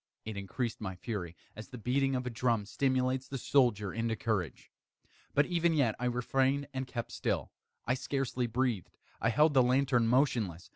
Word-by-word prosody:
It 110 -1 -5
increased 110 +5 -3
my 95 -3 -4
fury, 90 -4 -5 0.2
as 110 - -8
the 130 -2 -9
beating 135 +4 +1
of 125 0 -2
a 125 - -3
drum 115 -2 0
stimulates 130 +2 0
the 135 - -4
soldier 120 -7 +2
into 115 0 -1
courage. 100 - -3 0.6
But 145 - +5
even 170 -1 +1
yet 130 -7 +3
I 125 - -2
refrained 135 +3 +1
and 130 0 -3
kept 120 -2 -5
still. - - -2 0.3
I 125 - +2
scarcely 130 -2 -1
breathed. 120 - -1 0.2
I 115 - +3
held 150 +6 +4
the 135 - +6
lantern 125 -1 +3
motionless. 115 - +1
125 Hz, 175 wpm, -32 LUFS, 110-135 Hz, 0.6 s, the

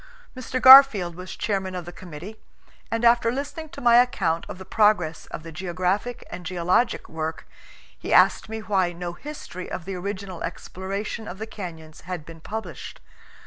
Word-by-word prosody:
Mr. 255 0 -3
Garfield 260 -10 +9
was 180 +2 -8
chairman 190 -3 -2
of 180 -2 -5
the 175 - -8
committee, 180 +5 -10 0.5
and 230 +1 -1
after 235 0 +4
listening 285 +4 -5
to - - -10
my 240 0 +7
IV - - +4
PREFACE. - - -12
account 165 -3 0
of - - -7
the 190 - -10
progress 210 -8 +2
of - - -8
the 165 - -9
geographic 185 +7 -2
and 180 - -7
geologic 180 +6 0
work, 160 0 -5 0.5
he - - -6
asked - - +4
me 220 0 -5
why 190 -5 +1
no 175 0 -5
history 185 - -8
of 170 - -6
the 195 - -5
original 190 -1 -5
exploration 195 +5 -5
of 185 - -7
the 220 - -5
canyons 165 -7 -9
had 175 -3 -6
been 165 0 -11
published. 200 -6 -7
190 Hz, 180 wpm, -24 LUFS, 175-220 Hz, 0.5 s, Garfield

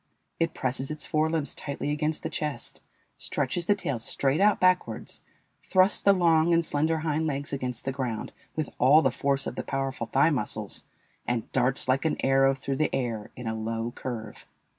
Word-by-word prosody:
It 165 0 0
presses 130 +1 -1
its 155 0 -2
fore 155 +1 +1
limbs 160 -3 -1
tightly 145 0 -3
against 150 +1 -1
the - - -2
chest, 150 -1 -3 0.4
stretches 175 -1 -2
the 205 - +4
tail 140 - -3
straight 135 +7 +1
out 205 0 +4
backwards, 185 0 +1 0.4
thrusts 185 +1 +3
the 200 - +6
long 170 -3 +4
and 165 0 +2
slender 155 +2 +1
hind 160 0 0
legs 140 -1 -3
against 125 -3 -3
the 135 - 0
ground 125 -5 -3 0.2
with 155 -1 -2
all 145 +6 +6
the 130 - +3
force 140 +2 0
of - - -5
the - - -2
powerful 135 -1 -3
thigh - - +3
muscles, - - -1 0.4
and 120 -2 -2
darts 130 +1 +1
like 130 +1 +2
an 160 - 0
arrow 135 0 +4
through 135 0 -3
the 155 - +2
air 115 -5 -3
in 125 - -8
a 110 - -1
low 115 +1 -3
curve. 120 -3 -7
140 Hz, 185 wpm, -27 LUFS, 130-160 Hz, 0.4 s, the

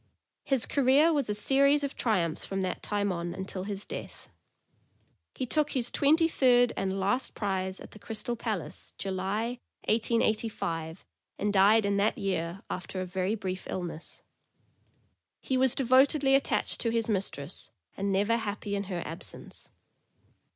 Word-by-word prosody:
His 265 -4 +1
career 285 +4 +4
was 280 -7 0
a 210 - 0
series 280 +6 +4
of 280 - -3
triumphs 175 -9 0
from 195 0 -3
that 185 -1 -2
time 205 -1 -1
on 170 -1 -3
until 190 0 -5
his 200 -1 -5
death. - - -8 1.1
He 260 - -2
took 300 +4 +1
his 245 -3 0
twenty 315 +4 +4
third 245 -5 +4
and 195 0 -1
last 205 +7 0
prize 190 -2 -2
at - - -11
the 215 - -13
Crystal 225 +4 -3
Palace, 220 -7 -5
July, 200 +5 -2 0.3
1885, 215 -7 0 0.3
and 205 0 0
died 205 +2 +5
in 200 0 +1
that 205 +2 +2
year, 185 -1 -2
after 185 +1 -5
a 185 - -2
very 185 +3 -1
brief 185 -3 -5
illness. 175 -3 -6 1.2
He 260 - -2
was 260 0 +3
devotedly 270 +2 +4
attached 275 0 +2
to 230 - +1
his 230 -1 0
mistress, 185 -7 -2 0.3
and 200 0 -1
never 205 +4 +2
happy 205 -2 -3
in 200 0 -2
her 180 -3 -4
absence. 165 +2 -9
205 Hz, 150 wpm, -29 LUFS, 190-245 Hz, 1.2 s, died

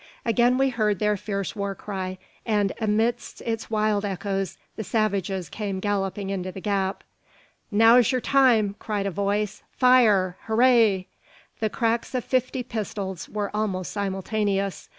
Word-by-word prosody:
Again 240 +2 +3
we 270 0 +3
heard 215 -5 0
their 210 +2 +1
fierce 200 -1 -4
war 200 -1 -3
cry, 190 -2 -5 0.3
and 205 -3 +1
amidst 225 +3 0
its 225 -1 -3
wild 215 -2 +1
echoes 195 -1 -3 0.2
the 220 - -4
savages 195 -4 -1
came 200 -3 -4
galloping 195 0 -2
into 185 -1 -3
the 190 - -8
gap. 195 -1 -1 0.7
"Now's 230 +3 +5
yur 255 - +1
time," 240 -6 +3
cried 205 -2 -2
a 200 - -1
voice; 200 +2 -1
"fire! 215 -8 +4
Hooray!" 220 -4 +4 0.5
The 220 - 0
cracks 230 +3 -1
of 250 - 0
fifty 255 0 0
pistols 200 -5 -5
were 205 -1 -3
almost 195 -4 -2
simultaneous. 200 0 -2
210 Hz, 140 wpm, -25 LUFS, 195-225 Hz, 0.7 s, Now's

